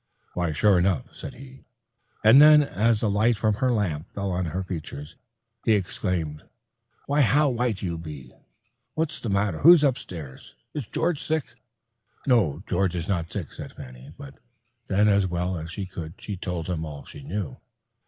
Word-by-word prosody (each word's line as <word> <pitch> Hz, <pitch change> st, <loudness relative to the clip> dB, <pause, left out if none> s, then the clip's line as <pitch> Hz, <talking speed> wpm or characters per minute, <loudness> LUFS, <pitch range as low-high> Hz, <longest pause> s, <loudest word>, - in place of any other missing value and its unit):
"Why, 85 Hz, -2 st, -1 dB
sure 95 Hz, +5 st, +4 dB
enough," 90 Hz, -6 st, 0 dB
said -, -, -8 dB
he, 135 Hz, +1 st, -13 dB, 0.6 s
and 115 Hz, +6 st, +8 dB
then 150 Hz, 0 st, +8 dB
as 115 Hz, -3 st, +1 dB
the 110 Hz, -, +1 dB
light 110 Hz, +3 st, +2 dB
from 110 Hz, +1 st, +2 dB
her 130 Hz, 0 st, +1 dB
lamp 95 Hz, -9 st, -1 dB
fell 100 Hz, -1 st, -2 dB
on 90 Hz, 0 st, -1 dB
her 90 Hz, +4 st, -3 dB
features, 75 Hz, -5 st, -7 dB, 0.5 s
he 110 Hz, -, +3 dB
exclaimed, 90 Hz, -6 st, -2 dB, 0.6 s
"why, 145 Hz, +1 st, +2 dB
how 145 Hz, +3 st, +4 dB
white 120 Hz, -5 st, -1 dB
you 85 Hz, -3 st, -3 dB
be! 75 Hz, -6 st, -9 dB, 0.6 s
What's 155 Hz, -1 st, -2 dB
the 115 Hz, -, -4 dB
matter? 100 Hz, -3 st, 0 dB
Who's 165 Hz, +1 st, +8 dB
upstairs? 95 Hz, -, -3 dB, 0.2 s
Is 140 Hz, -8 st, -4 dB
George 165 Hz, -2 st, -1 dB
sick?" 155 Hz, -7 st, -2 dB, 0.7 s
"No, 95 Hz, -, +2 dB
George 95 Hz, 0 st, 0 dB
is 85 Hz, 0 st, -3 dB
not 85 Hz, -3 st, -1 dB
sick," 95 Hz, -8 st, -5 dB
said -, -, -9 dB
Fanny, 65 Hz, +2 st, -11 dB
"but—," 140 Hz, -1 st, -11 dB, 0.5 s
and 95 Hz, -, 0 dB
then 105 Hz, +1 st, +5 dB
as 100 Hz, -2 st, +3 dB
well 90 Hz, +1 st, -2 dB
as 80 Hz, -1 st, -6 dB
she 95 Hz, +3 st, -5 dB
could 85 Hz, -2 st, -8 dB
she 105 Hz, -, -5 dB
told 90 Hz, -3 st, -4 dB
him 85 Hz, -3 st, -2 dB
all 75 Hz, -3 st, -8 dB
she -, -, -11 dB
knew. 80 Hz, +1 st, -4 dB
95 Hz, 175 wpm, -25 LUFS, 85-120 Hz, 0.7 s, and